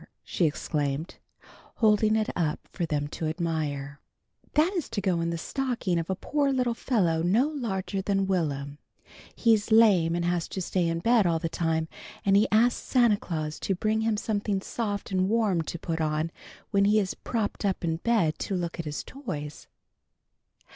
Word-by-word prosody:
she 175 - 0
exclaimed, 150 0 -2 0.6
holding 215 -1 +3
it 220 -1 0
up 160 -4 -1
for 170 -3 -2
them 145 -2 -1
to 155 +2 -4
admire. 150 -3 -3 0.5
"That 320 +6 +3
is 350 -6 -2
to 210 - -2
go 185 -4 +1
in 165 - 0
the 170 - -2
stocking 235 - -1
of 165 - -4
a 190 - 0
poor 285 +7 0
little 250 -3 +1
fellow 185 -10 +1
no 215 - +3
larger 200 -9 -3
than 195 0 +1
Will'm. 145 -6 -2 0.6
He's 225 -2 +3
lame 195 -7 +5
and 175 0 -1
has 175 -1 0
to - - -5
stay 180 -1 0
in 165 0 -1
bed 230 -2 +4
all 165 -1 +2
the 165 0 -2
time, 160 -1 0 0.4
and 195 0 +4
he 205 +2 +5
asked 235 +3 +3
Santa 240 -5 +3
Claus 155 -5 -4
to 195 - -1
bring 215 +4 0
him 220 -1 +1
something 205 -2 -1
soft 205 0 -4
and 185 0 +1
warm 215 -6 +2
to 160 - -5
put 165 -1 -3
on 155 +1 0 0.4
when 200 0 +3
he 210 +2 +4
is 190 -3 -1
propped 220 -3 -3
up 195 -3 -1
in 165 -1 0
bed 190 -6 +1
to 195 - -2
look 175 -1 -3
at 170 - -3
his 150 -1 -4
toys." 150 - -7
185 Hz, 180 wpm, -27 LUFS, 165-220 Hz, 0.6 s, lame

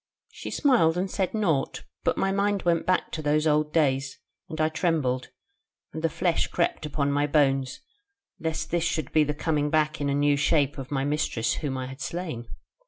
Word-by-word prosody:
She - - -7
smiled 230 - +3
and 185 +1 -1
said 190 +1 -1
naught; 165 -11 0 0.2
and - - +2
my 195 - +1
mind 200 0 0
went 170 -1 +1
back 185 0 +1
to 160 - -4
those 150 +1 +1
old 150 0 +2
days, 135 -4 +1 0.3
and 155 - -6
I 155 - +3
trembled, 155 -6 0 0.6
and 160 - -5
the 165 - +3
flesh 170 +1 0
crept 170 -3 -1
upon 140 -1 0
my 145 +1 +1
bones, 135 - +1 0.6
lest 160 -1 -3
this 170 -1 +1
should 160 -4 -1
be 155 - +4
the 150 0 -2
coming 150 -1 0
back 155 0 +1
in 140 - 0
a 140 - +1
new 145 0 +3
shape 145 -1 +2
of 130 - -7
my 135 -2 -1
mistress 145 -6 0
whom 140 -4 -3
I 130 - -3
had 130 +2 -9
slain. 160 -10 -4
150 Hz, 195 wpm, -26 LUFS, 140-165 Hz, 0.6 s, be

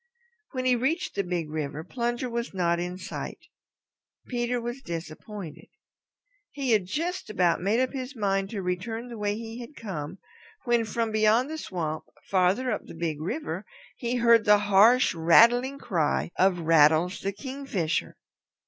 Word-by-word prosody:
When 255 -1 -2
he 255 -1 +4
reached 275 +9 -1
the 200 - -1
Big 175 -4 -3
River, 155 0 -4
Plunger 240 +4 -2
was 235 -3 -4
not 170 -2 +1
in 180 +1 -4
sight. - - -6 0.9
Peter 245 0 -1
was 240 +3 -5
disappointed. 170 - -7 0.8
He 275 -4 -2
had 205 -5 +3
just 335 - -3
about 180 -5 +2
made 205 +6 +2
up 260 0 +1
his 265 0 -5
mind 195 -3 0
to 200 -3 -4
return 225 +7 -3
the 235 - -7
way 205 0 0
he 225 +1 -7
had 245 +5 -9
come, 185 - -6 0.5
when 240 -2 +2
from 225 +1 -1
beyond 220 +6 +3
the 315 - -4
swamp, 160 - -4 0.2
farther 195 +7 +2
up 210 - -1
the - - -11
Big 160 -2 -3
River, 185 - -3 0.3
he 240 0 -2
heard 235 -2 +5
the 210 0 +6 0.2
harsh, 230 +6 +6
rattling 235 +11 +5
cry 170 - 0
of 185 -2 +3
Rattles 160 +3 +4
the 195 - -2
Kingfisher. 215 - -3
210 Hz, 155 wpm, -27 LUFS, 175-240 Hz, 0.9 s, the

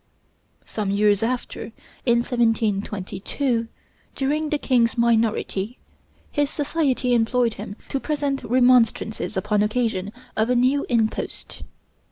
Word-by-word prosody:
Some 210 -3 -3
years 205 0 +3
after, 240 0 -3 0.4
in 235 0 +4
1722, 225 +1 0 0.5
during 300 +3 0
the 300 - +1
king's 240 -4 +2
minority, 230 -1 +1 0.5
his 290 -2 +1
society 285 -5 0
employed 235 0 +2
him 200 - -7
to 275 - -1
present 285 -2 -2
remonstrances 245 -4 +2
upon 210 +2 +1
occasion 210 -3 0 0.2
of 220 +2 +1
a 250 - +3
new 260 +4 +2
impost. 225 -3 -1
235 Hz, 110 wpm, -23 LUFS, 215-260 Hz, 0.5 s, in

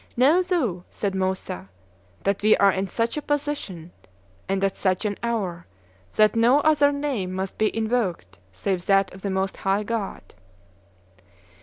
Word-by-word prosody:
"Know 290 +9 +5
thou," 285 - -1
said 200 -2 -3
Moussa, 185 - -3 0.5
"that 200 0 0
we 215 +1 +5
are 200 -1 +5
in 190 +1 -2
such 230 +6 -1
a - - -1
position 285 - -3 0.6
and 195 0 0
at 195 -1 +1
such 185 +2 0
an 205 -1 0
hour 200 -8 -2 0.5
that 215 +1 +4
no 240 +5 +5
other 290 -2 +4
name 280 -10 -2
must 190 0 -4
be 215 -1 +3
invoked 210 - -1
save 175 - -3
that 195 -1 +3
of 190 - -12
the 200 - -2
most 190 0 -1
high 195 +2 0
God." 220 -2 -4
200 Hz, 155 wpm, -24 LUFS, 190-240 Hz, 0.6 s, Know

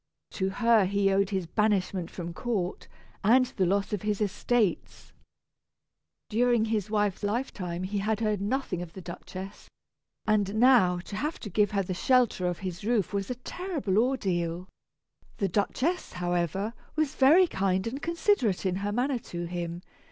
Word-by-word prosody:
To 190 -1 -1
her 230 0 +4
he 200 +1 +2
owed 195 0 +2
his 190 -4 -1
banishment 190 -2 0
from 170 -2 -6
court, 195 -2 -3 0.4
and 250 +5 +5
the 190 -7 -1
loss 200 +3 0
of 205 - -1
his 210 -1 -1
estates. 210 0 -1 1.1
During 235 0 +2
his 215 -3 -1
wife's 205 -2 0
lifetime 205 -5 -2
he 200 +2 -2
had 215 +2 0
heard 215 -3 0
nothing 205 -4 -1
of 170 -2 -8
the 190 - -8
Duchess, 185 +2 -9 0.6
and 210 -2 +1
now 225 -7 +5
to 200 - -8
have 300 +9 -2
to 205 - -7
give 205 +2 +3
her 200 -2 0
the 185 - -3
shelter 240 -3 +2
of 175 -1 -1
his 185 +1 -5
roof 215 -3 0
was 200 -1 -2
a 250 - -2
terrible 270 - -2
ordeal. 180 -8 0 0.7
The 195 - 0
Duchess, 260 - -1
however, 175 +4 -1 0.2
was 310 -3 0
very 310 +8 +6
kind 190 - 0
and 260 +5 -4
considerate 335 - +1
in 185 -1 +1
her 200 +1 -2
manner 250 +3 0
to 175 -5 -6
him. 170 0 -5
205 Hz, 160 wpm, -28 LUFS, 185-235 Hz, 1.1 s, very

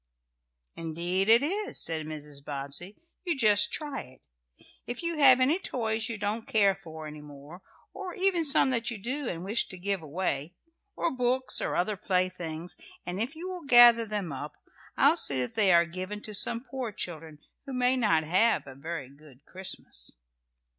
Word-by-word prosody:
"Indeed 175 +4 -1
it 230 +4 +6
is," 410 +7 -2
said 160 -2 -1
Mrs. 150 -2 -7
Bobbsey. 140 +7 -5 0.3
"You 340 -6 0
just 210 -4 +5
try 290 -3 -3
it. 130 0 -17 0.6
If 245 +6 -5
you 335 -2 -2
have 260 -3 +7
any 285 +8 +3
toys 225 -8 -1
you 230 - -3
don't 210 +2 -3
care 200 -3 +3
for 160 -5 -10
any 150 0 -9
more, 145 +4 -13 0.3
or 380 -3 -7
even 370 -3 +1
some 275 -3 +4
that 235 -1 +1
you 235 - -4
do, 255 +6 -1
and 170 0 -5
wish 210 +5 0
to 185 - -10
give 195 0 -2
away, 155 0 -3 0.4
or 340 - -1
books 255 0 0
or - - -2
other 200 +3 0
playthings, 180 -3 -2 0.3
and 180 +3 -3
if 255 +8 -1
you 340 +3 -7
will 365 -4 -7
gather 240 -3 +8
them 205 -6 -3
up, 145 +3 -7 0.4
I'll 295 +5 +5
see 135 - +1
that 125 - -3
they 205 -4 +4
are 170 0 +5
given 185 +4 -5
to 215 - -7
some 230 +3 -1
poor 255 -3 -5
children 160 -5 -6 0.3
who 270 - -6
may 250 0 +2
not 210 -11 +2
have 185 +9 +2
a 135 - -10
very 145 0 -6
good 140 0 -18
Christmas." 190 - -9
200 Hz, 180 wpm, -28 LUFS, 160-250 Hz, 0.6 s, gather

